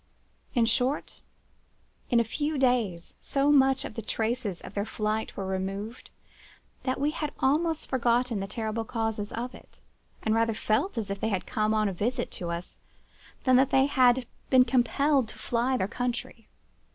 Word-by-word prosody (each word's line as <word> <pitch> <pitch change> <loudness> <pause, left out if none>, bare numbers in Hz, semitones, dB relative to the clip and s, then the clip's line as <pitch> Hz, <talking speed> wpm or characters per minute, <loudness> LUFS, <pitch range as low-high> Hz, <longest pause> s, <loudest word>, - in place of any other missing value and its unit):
In 235 -2 +4
short, 250 +5 0 0.9
in 240 - +4
a - - +4
few 295 +7 -2
days 235 -10 +1
so 280 +1 +1
much 270 -2 +4
of - - -6
the 225 - -5
traces 220 -2 -2
of - - -10
their 200 - -1
flight 215 0 -2
were 195 - -3
removed, 195 +4 -4 0.7
that 260 0 -1
we 290 +2 +1
had 300 -2 -3
almost 315 +4 +1
forgotten 245 -2 +1
the 195 - -3
terrible 220 +2 -3
causes 225 -2 -2
of 245 +2 -4
it, - - -15 0.4
and 220 - +2
rather 225 0 +2
felt 225 - 0
as 210 -3 -2
if 200 - -3
they 220 - 0
had 190 -4 -1
come 215 0 0
on 215 -1 +2
a 195 - -2
visit 240 +7 -1
to 175 - -5
us 170 +1 -5 0.6
than 255 -1 +5
that 265 0 +4
they 265 0 +4
had 255 -2 +4 0.2
been 255 -1 +6
compelled 265 +2 +2
to - - -11
fly 245 +2 0
their 190 - 0
country. 245 -1 -4
235 Hz, 175 wpm, -28 LUFS, 215-260 Hz, 0.9 s, been